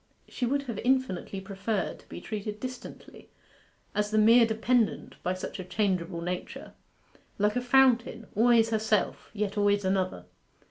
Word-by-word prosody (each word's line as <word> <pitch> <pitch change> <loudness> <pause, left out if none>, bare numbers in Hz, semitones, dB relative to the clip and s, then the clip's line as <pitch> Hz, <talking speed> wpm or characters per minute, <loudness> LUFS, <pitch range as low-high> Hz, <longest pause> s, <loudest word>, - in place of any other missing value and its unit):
She 245 - -3
would 280 +3 0
have 235 -6 -5
infinitely 245 -7 0
preferred 195 +1 -3
to - - -22
be - - -8
treated 210 -1 -5
distantly, 255 0 -9 0.6
as 210 0 0
the 215 - 0
mere 230 +2 +6
dependent, 225 +1 0
by 180 +1 -1
such 185 - -6
a - - -4
changeable 180 -3 -1
nature 180 +1 -5 0.6
like 210 +2 +1
a 250 - +1
fountain, 245 -3 +3
always 225 +1 +4
herself, 220 -2 0
yet 205 0 -2
always 205 -1 +2
another. 185 -1 -1
215 Hz, 145 wpm, -28 LUFS, 195-240 Hz, 0.6 s, mere